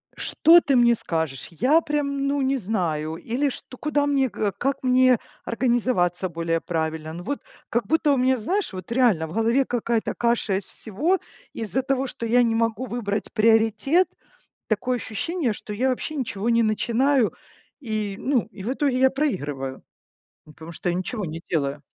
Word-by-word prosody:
Что 335 +1 +5
ты 275 - +1
мне 240 -1 +5
скажешь? 160 - -3
Я 265 - +3
прям, 280 -2 -1
ну, 285 0 0
не 270 +1 +1
знаю. 170 -8 -2
Или 250 +9 -1
что, 255 0 -9
куда 295 -1 0
мне, 275 -2 +2
э, 205 -2 0
как 275 +1 -1
мне 255 -1 +4 0.3
организоваться 230 -7 +1
более 165 0 -1
правильно? 160 -2 -3
Ну, 175 +2 -7
вот 285 +8 -3 0.3
как 235 -1 0
будто 315 -2 +3
у 275 - +1
меня, 260 +1 +3
знаешь, 365 - -2
вот 185 +2 -8
реально 230 -10 +3
в 160 - -9
голове 230 +4 +2
какая-то 235 -2 -1
каша 235 -5 +1
из 195 - -6
всего. 305 - -1 0.3
Из-за 230 +4 -2
того, 270 0 0
что 235 - -6
я 240 +2 +4
не 225 -1 +1
могу 230 +1 0
выбрать 220 -4 -3
приоритет, 225 - +3 0.6
такое 245 +4 0
ощущение, 255 - -2
что 210 - -8
я 245 +6 0
вообще 260 +4 -2
ничего 230 -4 -2
не 230 0 +4
начинаю. 235 +3 +2 0.5
И 215 -5 -3
ну, 260 -5 0
и 195 - -10
в 245 - -1
итоге 275 -2 0
я 265 0 +6
проигрываю, 145 - -2 0.6
ну, 150 - -15
потому 160 +2 -10
что 175 +2 -3
я 175 - 0
ничего 195 +3 -3
не 165 0 -6
делаю. 145 -3 -1
230 Hz, 175 wpm, -24 LUFS, 190-265 Hz, 0.6 s, я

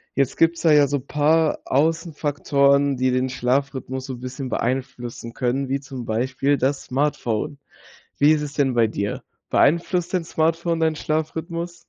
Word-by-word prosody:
Jetzt 140 -2 +1
gibt's 165 +1 +2
da 160 - +5
ja 145 -1 +6
so 145 0 -1
paar 150 +3 +1
Aussenfaktoren, 145 -3 +1
die 130 0 +1
den 130 +1 0
Schlafrhythmus 130 +1 -2
so 130 -2 -6
bisschen 130 +2 -6
beeinflussen 125 -1 -3
können, 130 +2 -1
wie 135 +1 0
zum 130 -2 -8
Beispiel 130 +5 0
das 135 +1 0
Smartphone. 140 -2 -1 0.6
Wie 145 +2 +6
ist 150 - 0
es 150 -1 -4
denn 140 -4 +1
bei 115 -2 +3
dir? 100 -1 -3 0.3
Beeinflusst 170 +4 +2
dein 180 -3 0
Smartphone 165 +1 0
deinen 160 -1 +2
Schlafrhythmus? 165 +3 -3
140 Hz, 150 wpm, -22 LUFS, 130-155 Hz, 0.6 s, ja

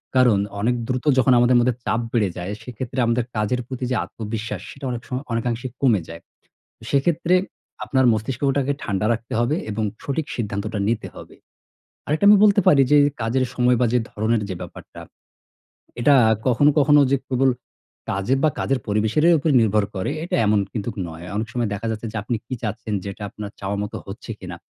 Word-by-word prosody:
কারণ 125 -5 +5 0.2
অনেক 120 +4 +2
দ্রুত 130 +1 -2
যখন 130 0 +5
আমাদের 120 +1 +4
মধ্যে 120 0 +2
চাপ 115 - 0
বেড়ে 110 -5 +2
যায় 90 +2 -4
সেক্ষেত্রে 125 +2 -5
আমাদের 115 +1 +1
কাজের 110 +4 0
প্রতি 130 -1 -6
যে - - +2
আত্মবিশ্বাস, 105 -2 -5
সেটা 135 0 -9
অনেক 120 -1 -4
সময় 130 +2 -4
অনেকাংশে 115 +2 -2
কমে 120 -8 +3
যায়। 85 0 -9 0.7
সেক্ষেত্রে 170 +5 +2 0.5
আপনার 130 -1 +2
মস্তিষ্কটাকে 135 +5 0
ঠান্ডা 100 +1 -1
রাখতে 115 0 -5
হবে 125 +6 +1
এবং 110 +1 -2 0.2
সঠিক 145 +2 -2
সিদ্ধান্তটা 105 -1 -3
নিতে 115 -1 -1
হবে। - - -12 0.7
আরেকটা 155 +7 +1
আমি 210 - +8
বলতে 205 -1 +5
পারি 140 - +6
যে, 150 - +7 0.2
কাজের 125 +4 +1
সময় 125 0 +3
বা - - +4
যে 125 - +4
ধরনের 110 +1 0
যে 95 - -3
ব্যাপারটা - - -10 1.0
এটা 145 +4 +5 0.3
কখনো, 130 +4 +4
কখনো 145 0 +6
যে - - +5
কেবল 130 0 +3 0.6
কাজে 100 +7 0
বা 155 - +5
কাজের 135 -1 0
পরিবেশের 110 +8 +1
এ - - +6
উপর 155 +2 0
নির্ভর 105 -2 +2
করে 95 -1 -2
এটা 175 - -1
এমন 105 0 +3
কিন্তুক 110 0 -4
নয়। 80 +1 -9
অনেক 110 +1 -2
সময় 120 -2 -1
দেখা 100 +3 -5
যাচ্ছে 110 +1 -4
যে, - - -6
আপনি 115 +3 -2
কি 130 - -4
চাচ্ছেন? 110 0 -3
যেটা 100 +1 -7
আপনার 105 0 -7
চাওয়া 100 +1 -2
মতো 105 - -5
হচ্ছে 100 +4 -9
কিনা? 90 -2 -7
120 Hz, 180 wpm, -22 LUFS, 105-130 Hz, 1.0 s, আমি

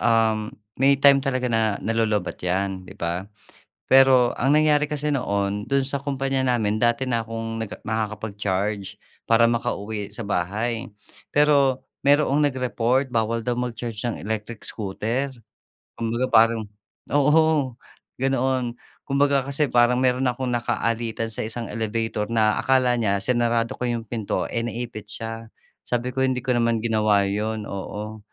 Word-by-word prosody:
uhm, 110 -2 +2 0.3
may 140 +1 +5
time 140 0 +6
talaga 130 -2 -1
na 110 -2 +2
nalo-lowbatt 110 -4 0
'yan, 95 +1 -2
'di - - -11
ba? 85 +4 -3 0.6
Pero 130 -2 +6
ang 135 +4 +2
nangyari 150 -1 +4
kasi 150 0 -2
noon, 100 -6 -1
do'n 140 0 +1
sa 140 +1 -2
kompanya 135 -1 -1
namin, 110 -4 +1
dati 120 +3 +1
na 115 -2 0
kong 115 0 -5 0.2
nakakapag-charge 105 -2 -3 0.2
para 115 0 +4
makauwi 110 -3 -3
sa 120 - -7
bahay. 110 +5 -2 0.5
Pero 140 -3 +4 0.2
mayroong 145 0 +4
nag-report, 130 0 0
bawal 115 0 0
daw 120 +1 -2
mag-charge 120 -2 -4
ng 120 - -3
electric 110 +1 -4
scooter. 115 +6 -3 0.6
Kumbaga, 115 +2 -1
parang 115 0 +5 0.5
oo, 150 -2 +3 0.5
ganoon. 130 -2 0 0.3
Kumbaga, 140 -1 +2
kasi 145 0 0
parang 120 +1 +4
meron 130 0 +2
akong 125 +1 -3
nakaalitan 115 -1 -1
sa - - -4
isang 115 +1 -5
elevator 110 -1 -2
na 110 -2 +2
akala 130 -2 +3
niya 100 -2 +2
sinarado 120 0 +1
ko - - -28
'yung 115 -1 -2
pinto, 110 -3 -2
eh, 115 - -1
naipit 115 -3 -6
siya. 115 +1 -7 0.4
Sabi 125 +1 -1
ko, - - -1
hindi 130 -1 0
ko 130 - +1
naman 115 -1 +2
ginawa 110 -3 +3
'yun. 105 +2 -2
Oo, 105 +2 -6
115 Hz, 140 wpm, -24 LUFS, 110-130 Hz, 0.6 s, time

